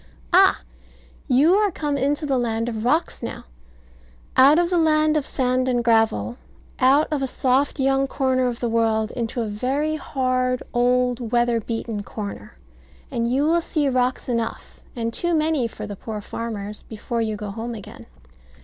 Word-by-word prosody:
Ah, - - +5 0.7
you 290 +8 +4
are 415 +1 +3
come 295 -5 -2
into 285 +3 0
the 270 -3 +1
land 230 -1 -1
of 220 -2 -3
rocks 305 +8 0
now: - - -6 0.9
out 275 +4 +7
of 345 +1 +2
the 355 - +2
land 310 -1 +3
of 300 -3 0
sand 255 0 0
and 245 -1 +1
gravel; 225 - +2 0.4
out 270 +4 +4
of 295 -3 0
a 270 - 0
soft 265 +3 +1
young 270 0 +2
corner 260 -2 +1
of 240 -1 -4
the 240 - 0
world 225 -1 +1
into 235 0 -3
a - - -3
very 270 +9 -1
hard, 255 -3 -1
old, 245 -1 +1
weather 240 -1 +2
beaten 225 -1 -4
corner; 200 - -7 0.5
and 235 0 -1
you 270 +3 +2
will 335 +3 +3
see 300 -3 0
rocks 255 0 0
enough, 230 -2 -3 0.2
and 230 -1 -3
too 345 +5 0
many 310 -5 +1
for 215 -1 -8
the 205 -1 -6
poor 215 +2 -6
farmers, 210 -1 -6
before 230 +2 -4
you 220 -1 -1
go 210 -1 -6
home 230 +3 -5
again. 205 - -11
250 Hz, 170 wpm, -23 LUFS, 225-280 Hz, 0.9 s, out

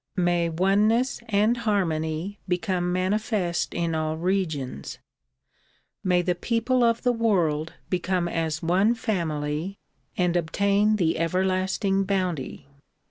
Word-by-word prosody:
May 175 -1 +2
oneness 205 +8 +2
and 215 +3 +3
harmony 185 -4 -1
become 180 -1 0
manifest 185 -1 -1
in 170 -1 -1
all 155 0 -1
regions. 160 - -2 1.1
May 180 -1 +2
the 180 - +1
people 235 +7 0
of 230 0 +2
the 245 - +3
world 170 -9 +1
become 180 -1 0
as 165 -2 -2
one 190 +7 +3
family 165 -4 -2 0.4
and 180 -1 +1
obtain 200 +5 +2
the 165 -6 +1
everlasting 185 +3 +1
iDOunty. 180 -8 -2
185 Hz, 110 wpm, -25 LUFS, 165-205 Hz, 1.1 s, and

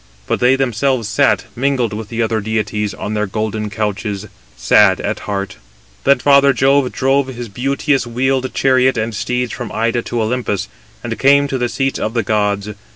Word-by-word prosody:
But - - -1
they 125 +2 +4
themselves 130 -2 0
sat, 135 +6 +2
mingled 125 -3 0
with 105 0 -6
the 115 0 -1
other 110 -1 -1
deities, 105 -1 -2
on 105 - -5
their 105 -1 -1
golden 110 +1 -3
couches, 105 -2 -3 0.3
sad - - +4
at - - -3
heart. 100 -1 -3 0.5
Then 140 0 +5
father 140 -1 +5
Jove 135 -1 +2
drove 135 +1 +1
his 120 -3 -7
beauteous 135 +4 0
wheeled 130 +2 0
chariot 130 -1 +3
and 110 +1 -2
steeds 125 +4 -2
from 120 -4 -6
Ida 115 +2 0
to 120 -1 -2
Olympus, 110 -4 -2 0.4
and - - -4
came 140 +1 +4
to 130 - -2
the 120 0 0
seats 135 +1 -1
of 110 +2 -3
the 115 - +1
gods. 105 -1 0
120 Hz, 175 wpm, -17 LUFS, 110-135 Hz, 0.5 s, Then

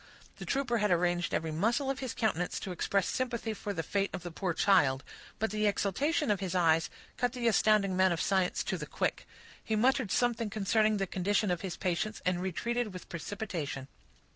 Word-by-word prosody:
The - - -8
trooper 265 -4 0
had 210 0 +2
arranged 175 -1 +1
every 160 0 -1
muscle 235 - +1
of 270 - -5
his 260 -3 -4
countenance 185 -6 0
to 190 - -4
express 190 +2 0
sympathy 235 -3 -2
for 205 0 -5
the 165 -4 -3
fate 200 +2 0
of 185 -2 -5
the 175 - -6
poor 180 +2 -2
child; 145 -9 +3 0.3
but 220 -2 -1
the 215 0 +1
exultation 270 - +1
of 200 - +1
his 185 -2 -3
eyes 165 -2 +3 0.3
cut 245 -1 0
the 245 -2 -1
astounded 215 -2 +4
man 185 0 +3
of 170 - -1
science 190 -2 +1
to - - -2
the - - -5
quick; - - -2 0.4
he 220 - -1
muttered 250 0 +2
something 235 0 +1
concerning 215 +1 +2
the 195 - 0
condition 195 +2 0
of 175 - -1
his 190 -3 -4
patients, 190 +4 -1
and 180 -1 +1
retreated 230 +4 -2
with 180 - -9
precipitation. 170 -6 -4
200 Hz, 195 wpm, -31 LUFS, 180-225 Hz, 0.4 s, astounded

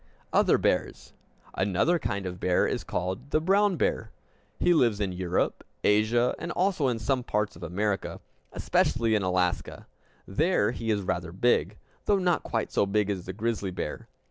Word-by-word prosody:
Other - - +4
Bears - - -1 0.4
Another 100 - +1
kind 100 -8 -3
of 90 -1 -5
bear 90 -1 +2
is - - -2
called 95 +9 -4
the 155 - +2
brown 195 +4 +3
bear. 110 - 0 0.5
He 175 - +3
lives 120 -10 +3
in 100 -3 -1
Europe, 90 0 -1 0.2
Asia, 110 +4 +3
and 170 +1 -4
also 180 -6 +1
in 120 -2 0
some 125 +3 -1
parts 105 -2 -1
of - - -13
America, 100 +1 -2 0.3
especially 115 -3 +1
in 105 - +2
Alaska. 90 -1 -1 0.4
There 140 - +2
he 115 -2 -5
is 105 -2 +1
rather 85 -2 -2
big, 95 -1 +1 0.3
though 205 - +3
not 180 -3 +1
quite - - -3
so 100 - +2
big 105 0 +1
as 95 -3 -4
the 95 - -4
grizzly 110 -1 -2
bear. 90 - -5
105 Hz, 170 wpm, -27 LUFS, 95-130 Hz, 0.5 s, Other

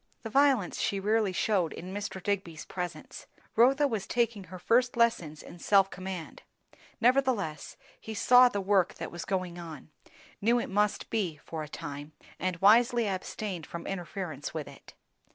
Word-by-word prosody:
The 225 - -6
violence 270 -7 +3
she 200 -3 0
rarely 210 0 +1
shewed 185 -3 0
in 185 +2 -8
Mr. 200 -2 -5
Digby's 185 -6 -2
presence; 180 -1 -6 0.3
Rotha 270 +5 +5
was 220 -6 -3
taking 235 -4 0
her 185 +1 -9
first 245 +6 +2
lessons 175 -10 +1
in 175 - -12
self 195 +1 +4
command; 185 -3 -7 0.6
nevertheless 245 - +1 0.2
he 220 - -7
saw 250 +3 +6
the 200 -4 -2
work 195 -2 +2
that - - -6
was 170 0 -6
going 185 -2 -2
on, 160 -2 -9 0.5
knew 235 +4 +3
it 235 - -4
must 210 +1 0
be, 180 -9 -1
for 160 -1 -6
a 150 - -7
time, 145 +1 -7 0.3
and 185 -1 -1
wisely 235 +4 +5
abstained 185 -2 -4
from 170 0 -7
interference 175 -5 -5
with 155 -2 -4
it. 140 - -14
195 Hz, 160 wpm, -29 LUFS, 175-225 Hz, 0.6 s, saw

